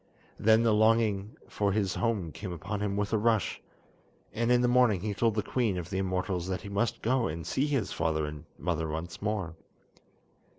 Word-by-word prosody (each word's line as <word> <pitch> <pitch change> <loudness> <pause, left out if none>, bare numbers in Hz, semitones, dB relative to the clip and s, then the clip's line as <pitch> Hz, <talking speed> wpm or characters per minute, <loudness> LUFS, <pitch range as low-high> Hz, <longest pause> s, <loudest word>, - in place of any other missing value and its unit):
Then 110 +1 +5
the 115 -2 +4
longing 110 -1 +2
for 100 -1 0
his 100 -3 0
home 105 -9 -1
came 90 +7 -6
upon 90 +5 -4
him 100 -1 -1
with 105 +1 -1
a 110 - +3
rush, 110 -3 +1 0.7
and 115 +2 +1
in 125 0 +5
the 125 - +3
morning 120 -6 +4
he 105 +1 -2
told 115 +1 +1
the 105 - 0
Queen 115 -7 0
of 90 +1 -6
the 95 - -1
Immortals 95 -1 -1
that 95 -1 -2
he 100 - -8
must 100 +3 -1
go 125 +1 +2
and 80 +1 -5
see 135 - 0
his 135 -8 0
father 80 -1 0
and 75 +1 -7
mother 80 -3 -1
once 80 +2 -5
more. 100 -5 -2
100 Hz, 200 wpm, -29 LUFS, 90-115 Hz, 0.7 s, Then